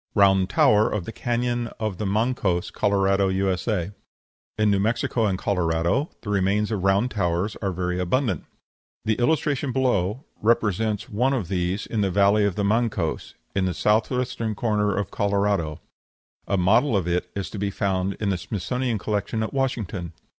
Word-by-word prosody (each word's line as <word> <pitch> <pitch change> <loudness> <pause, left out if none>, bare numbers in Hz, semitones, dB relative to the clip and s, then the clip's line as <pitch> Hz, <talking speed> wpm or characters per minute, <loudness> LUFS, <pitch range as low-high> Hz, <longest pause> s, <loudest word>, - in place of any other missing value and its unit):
ROUND 95 -2 +4
TOWER 105 +2 +4
OF 105 -5 -2
THE - - -5
CANYON 120 0 -1
OF 110 -4 -3
THE 105 - -1
MANCOS, 100 -4 0
COLORADO, 100 -1 +2
U.S. 95 0 0
In 100 -4 0 0.8
New 100 - +2
Mexico 115 +1 +1
and 95 -2 0
Colorado 85 - 0
the 105 - -4
remains 100 +2 +1
of 100 -4 -2
round 100 +6 +2
towers 95 0 -1
are 95 - -2
very 90 0 -2
abundant. 120 +8 0 0.6
The 110 - +2
illustration 140 0 +1
below 125 - 0 0.2
represents 110 -1 +1
one 125 +6 +1
of 110 -11 -2
these 90 +1 -1
in 110 - -2
the 100 - +2
valley 100 +2 +4
of 100 -3 0
the 105 - -1
Mancos, 105 -6 -1 0.2
in 95 -1 +2
the 90 -2 -1
south 105 +5 +2
western 125 -4 -2
corner 105 -2 0
of 100 -1 -2
Colorado. 100 -6 0 0.7
A 100 - +1
model 105 +7 +3
of 90 -3 -1
it 90 +1 -1
is 100 -1 -4
to 105 - -6
be 100 0 0
found 95 -1 -1
in 105 - -2
the 95 -3 0
Smithsonian 120 +5 -2
collection 105 +2 -2
at 110 - -4
Washington. 105 - -2
100 Hz, 170 wpm, -24 LUFS, 95-115 Hz, 0.8 s, ROUND